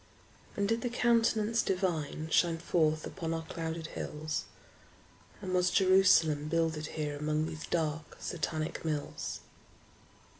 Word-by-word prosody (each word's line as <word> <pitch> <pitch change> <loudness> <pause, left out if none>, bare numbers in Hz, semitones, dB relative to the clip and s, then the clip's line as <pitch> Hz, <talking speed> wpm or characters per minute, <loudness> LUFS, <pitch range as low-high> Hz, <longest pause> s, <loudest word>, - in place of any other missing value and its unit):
And 200 0 +1
did 225 +2 +1
the 245 - -1
Countenance 230 -2 +2
Divine 170 -5 -1
Shine 170 -1 +3
forth 155 -2 +1
upon 165 -3 -3
our 165 - -3
clouded 165 0 -4
hills? 155 +1 -3 1.0
And 185 -1 -3
was 180 0 +3
Jerusalem 185 -6 +4
builded 160 -1 0
here 150 -1 -2
Among 150 +1 0
these 160 -1 -6
dark 160 -2 -2
Satanic 155 -2 -3
mills? 150 -3 -3
165 Hz, 120 wpm, -31 LUFS, 155-185 Hz, 1.0 s, Jerusalem